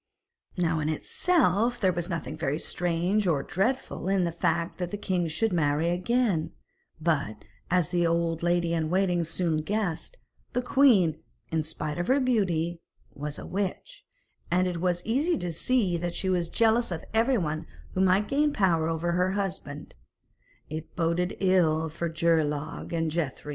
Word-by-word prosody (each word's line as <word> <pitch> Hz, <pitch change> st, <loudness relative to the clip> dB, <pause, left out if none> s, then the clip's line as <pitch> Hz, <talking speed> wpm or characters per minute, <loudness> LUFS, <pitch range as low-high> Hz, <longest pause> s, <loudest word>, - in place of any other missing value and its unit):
Now, 165 Hz, -2 st, +1 dB
in 155 Hz, 0 st, -1 dB
itself, 240 Hz, -, +1 dB
there 185 Hz, -4 st, +2 dB
was 175 Hz, +1 st, -3 dB
nothing 165 Hz, -3 st, -4 dB
very 150 Hz, -2 st, -1 dB
strange 175 Hz, +5 st, 0 dB
or 145 Hz, -5 st, +1 dB
dreadful 195 Hz, +1 st, -1 dB
in 195 Hz, -1 st, +2 dB
the 170 Hz, -, 0 dB
fact 170 Hz, +1 st, -1 dB
that 180 Hz, -1 st, -2 dB
the 205 Hz, -, -4 dB
king 180 Hz, -4 st, -1 dB
should 185 Hz, +7 st, 0 dB
marry 155 Hz, 0 st, +2 dB
again, 185 Hz, -1 st, 0 dB, 0.5 s
but, 140 Hz, -10 st, -1 dB, 0.2 s
as 180 Hz, -2 st, +2 dB
the 175 Hz, -1 st, +2 dB
old 165 Hz, -1 st, 0 dB
lady 175 Hz, -1 st, +1 dB
in 160 Hz, -2 st, 0 dB
waiting 180 Hz, -1 st, +2 dB
soon 165 Hz, 0 st, -1 dB
guessed, 200 Hz, -, -2 dB, 0.4 s
the 250 Hz, -, +1 dB
queen, 205 Hz, -, +4 dB, 0.3 s
in 160 Hz, -1 st, +1 dB
spite 155 Hz, 0 st, -4 dB
of 175 Hz, -, -1 dB
her 270 Hz, +2 st, +4 dB
beauty, 175 Hz, -, 0 dB, 0.3 s
was 150 Hz, +1 st, -5 dB
a -, -, -8 dB
witch, 200 Hz, -, -4 dB, 0.5 s
and 180 Hz, +1 st, +2 dB
as 180 Hz, -, -2 dB
it 165 Hz, -, -5 dB
was 175 Hz, -1 st, 0 dB
easy 295 Hz, +9 st, +1 dB
to 175 Hz, -2 st, -4 dB
see 195 Hz, -1 st, +1 dB
that 175 Hz, 0 st, -3 dB
she 190 Hz, -, 0 dB
was 175 Hz, -2 st, 0 dB
jealous 230 Hz, +1 st, +2 dB
of 170 Hz, -3 st, -5 dB
everyone 220 Hz, -, +1 dB, 0.3 s
who 185 Hz, -, 0 dB
might 190 Hz, +2 st, +3 dB
gain 295 Hz, +2 st, +2 dB
power 175 Hz, -, +2 dB
over 165 Hz, +1 st, -1 dB
her 180 Hz, +2 st, +1 dB
husband, 175 Hz, -7 st, -4 dB, 0.7 s
it 155 Hz, +1 st, -7 dB
boded 175 Hz, +2 st, 0 dB
ill 165 Hz, -4 st, +3 dB
for 165 Hz, +2 st, -3 dB
Geirlaug 160 Hz, -2 st, 0 dB
and 165 Hz, -2 st, 0 dB
Grethari. 150 Hz, -3 st, -3 dB
175 Hz, 165 wpm, -27 LUFS, 160-195 Hz, 0.7 s, queen